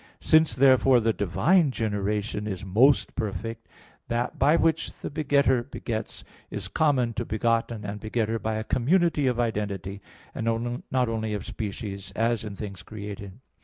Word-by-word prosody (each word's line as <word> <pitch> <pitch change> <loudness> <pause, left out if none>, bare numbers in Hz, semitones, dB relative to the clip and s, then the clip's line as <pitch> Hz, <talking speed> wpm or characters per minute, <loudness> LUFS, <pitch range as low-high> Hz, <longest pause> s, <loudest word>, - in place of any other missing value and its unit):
Since, 160 0 +4
therefore, 130 -1 +5
the 115 0 +1
divine 150 - +3
generation 105 -2 -2
is 95 -2 -4
most 120 +9 +4
perfect, 115 +1 -4 0.4
that 120 +1 -2
by 145 +4 +5
which 165 -1 +1
the - - -5
Begetter 140 -4 +2
begets, 115 -3 -5 0.3
is 100 -3 -4
common 125 - +1
to - - -2
Begotten 115 0 -1
and 105 +1 -5
Begetter 110 +1 -1
by 110 +1 -2
a 110 - -2
community 150 - +2
of 125 -1 0
identity, 100 -4 -2 0.3
and 115 +2 -2
not 130 -1 +1
only 110 -1 -2
of 100 - -5
species, 100 -3 -5
as 115 -1 +1
in 105 -2 -6
things 100 -4 -7
created. 100 0 -8
115 Hz, 150 wpm, -26 LUFS, 105-130 Hz, 0.4 s, therefore